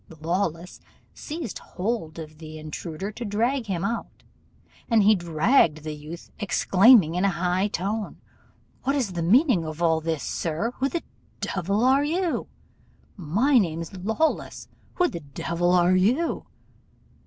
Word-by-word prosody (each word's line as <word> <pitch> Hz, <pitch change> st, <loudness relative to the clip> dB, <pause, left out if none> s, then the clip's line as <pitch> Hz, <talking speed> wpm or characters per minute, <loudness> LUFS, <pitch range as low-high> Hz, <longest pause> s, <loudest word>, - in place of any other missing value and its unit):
Lawless 170 Hz, +1 st, -2 dB, 0.3 s
seized 305 Hz, -, -6 dB
hold 185 Hz, -5 st, -4 dB
of 155 Hz, -1 st, -9 dB
the 155 Hz, -1 st, -9 dB
intruder 155 Hz, +5 st, -6 dB
to 240 Hz, -, -7 dB
drag 230 Hz, +4 st, 0 dB
him 180 Hz, -3 st, -2 dB
out, 230 Hz, +2 st, -4 dB, 0.7 s
and 225 Hz, -3 st, +4 dB
out -, -, +1 dB
he 215 Hz, -, +7 dB
dragged 170 Hz, -, +2 dB
the 155 Hz, -1 st, -4 dB
youth, 150 Hz, +3 st, -10 dB
exclaiming, 195 Hz, -2 st, +5 dB
in 180 Hz, +2 st, 0 dB
a 200 Hz, -, +4 dB
high 180 Hz, +2 st, 0 dB
tone, 205 Hz, +3 st, -3 dB, 0.6 s
'What 275 Hz, +2 st, 0 dB
is 250 Hz, -9 st, 0 dB
the 170 Hz, -, -2 dB
meaning 225 Hz, -, +4 dB
of 155 Hz, 0 st, -6 dB
all 165 Hz, -2 st, +2 dB
this, 160 Hz, -3 st, -2 dB
sir? 170 Hz, +8 st, -2 dB
Who 270 Hz, +1 st, +1 dB
the 340 Hz, -, -3 dB, 0.4 s
devil 195 Hz, +4 st, -1 dB
are 270 Hz, +2 st, +4 dB
you? 335 Hz, +3 st, -1 dB, 0.7 s
My 215 Hz, -, +2 dB
name's 165 Hz, -1 st, -2 dB
Lawless: 220 Hz, -, -1 dB, 0.3 s
who 360 Hz, -, +3 dB
the 170 Hz, -, -5 dB
devil 170 Hz, +4 st, -2 dB
are 180 Hz, 0 st, +4 dB
you? 240 Hz, -, +1 dB
185 Hz, 145 wpm, -25 LUFS, 165-230 Hz, 0.7 s, he